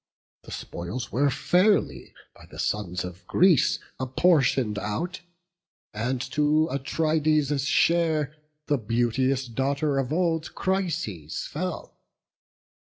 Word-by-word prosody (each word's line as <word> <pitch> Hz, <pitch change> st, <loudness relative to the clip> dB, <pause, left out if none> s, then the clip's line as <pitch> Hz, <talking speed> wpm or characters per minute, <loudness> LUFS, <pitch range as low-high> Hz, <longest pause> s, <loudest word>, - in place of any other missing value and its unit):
The -, -, -13 dB
spoils 100 Hz, +10 st, -6 dB
were 140 Hz, +3 st, +2 dB
fairly 185 Hz, +9 st, +1 dB, 0.2 s
by -, -, -16 dB
the -, -, -12 dB
sons 90 Hz, -4 st, -2 dB
of 90 Hz, +1 st, -10 dB
Greece 175 Hz, -6 st, +4 dB, 0.2 s
Apportion'd 130 Hz, -, +2 dB
out; 170 Hz, -, -3 dB, 0.7 s
and 120 Hz, +5 st, -1 dB
to 150 Hz, +2 st, +3 dB
Atrides' 150 Hz, 0 st, +1 dB
share 155 Hz, -2 st, +2 dB, 0.3 s
The 145 Hz, -2 st, +1 dB
beauteous 120 Hz, +4 st, 0 dB
daughter 140 Hz, +4 st, 0 dB
of 135 Hz, 0 st, -2 dB
old 165 Hz, -1 st, 0 dB
Chryses 155 Hz, -, -2 dB
fell. 180 Hz, +3 st, -5 dB
140 Hz, 100 wpm, -26 LUFS, 120-160 Hz, 0.7 s, Greece